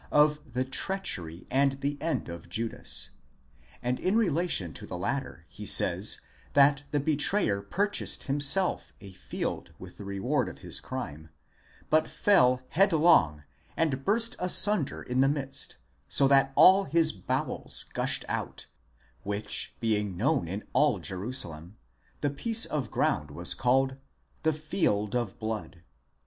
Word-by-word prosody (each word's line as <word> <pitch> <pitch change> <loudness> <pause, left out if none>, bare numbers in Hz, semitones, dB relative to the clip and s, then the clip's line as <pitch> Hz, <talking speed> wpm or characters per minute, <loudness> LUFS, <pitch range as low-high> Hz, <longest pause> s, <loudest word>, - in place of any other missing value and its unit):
of 150 0 +4
the 130 +1 0
treachery 110 - -4
and 135 +1 +3
the 140 +1 -1
end 165 0 -2
of 85 0 -9
Judas; 115 +5 -3 0.7
and 125 +1 -1
in 190 +3 0
relation 170 - +1
to - - -9
the 90 - -5
latter 120 - -4
he - - -11
says, - - +2 0.3
that 140 0 +5
the 145 - 0
betrayer 145 - +1
purchased 200 - -1
himself 145 +6 +1
a 100 - -11
field 95 - -5
with - - -12
the - - -7
reward 100 -1 -1
of - - -11
his - - -2
crime, 80 - -7 0.6
but 155 0 +3
fell 130 -11 +3
headlong, 155 - +4 0.3
and 140 -5 0
burst 225 - +1
asunder 180 -2 +3
in 125 +1 0
the 135 - +4
midst, 135 -2 -3 0.3
so 140 - +4
that 135 0 +4
all 195 +1 +7
his 160 +2 +2
bowels 95 - -2
gushed - - -1
out, - - -4 0.6
which 100 +1 -3
being 105 -5 -1
known 135 - +1
in 95 +5 -5
all - - +3
Jerusalem, 95 -3 -4 0.4
the 145 - 0
piece 225 +10 +4
of 135 -7 -3
ground - - 0
was - - -2
called 130 +2 +2
ἀκελδαμὰ, - - -10
i.e. 135 - -37
the 160 0 +1
field 125 - -1
of 120 -6 -2
blood. 110 -6 -5
135 Hz, 145 wpm, -28 LUFS, 105-155 Hz, 0.7 s, all